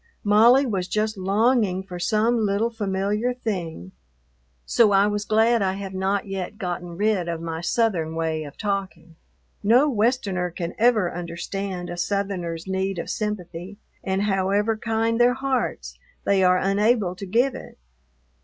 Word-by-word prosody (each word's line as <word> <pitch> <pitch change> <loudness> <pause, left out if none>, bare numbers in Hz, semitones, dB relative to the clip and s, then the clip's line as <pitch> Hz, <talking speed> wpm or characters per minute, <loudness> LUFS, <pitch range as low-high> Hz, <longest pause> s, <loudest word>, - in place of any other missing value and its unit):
Molly 230 +6 +5
was 195 -7 -2
just 215 +2 -1
longing 200 0 +1
for 180 -2 -8
some 220 +6 +2
little 215 +2 +1
familiar 210 +3 -1
thing, 170 - -4 0.7
so 220 -3 +4
I 195 +1 +5
was 205 0 -1
glad 225 +2 +3
I 190 -1 +1
have 195 0 -6
not 190 +1 -1
yet 195 +1 -5
gotten 175 -3 -5
rid 205 -4 +1
of 165 -1 -3
my 165 0 -5
Southern 175 -6 0
way 160 -1 -1
of 145 -1 -11
talking. 195 -4 -4 0.5
No 240 +8 +4
Westerner 210 -7 0
can 170 0 -5
ever 220 -6 +3
understand 175 +2 -5
a 175 - -6
Southerner's 175 -3 -2
need 190 0 -2
of 170 - -4
sympathy, 195 -2 -5 0.3
and, 190 +1 0
however 200 +2 +1
kind 225 +1 0
their 245 +1 +4
hearts, 265 -1 -2 0.2
they 195 -1 +2
are 180 0 +5
unable 200 0 +2
to 195 - -7
give 245 +7 +2
it. 260 - -10
200 Hz, 150 wpm, -24 LUFS, 180-220 Hz, 0.7 s, Molly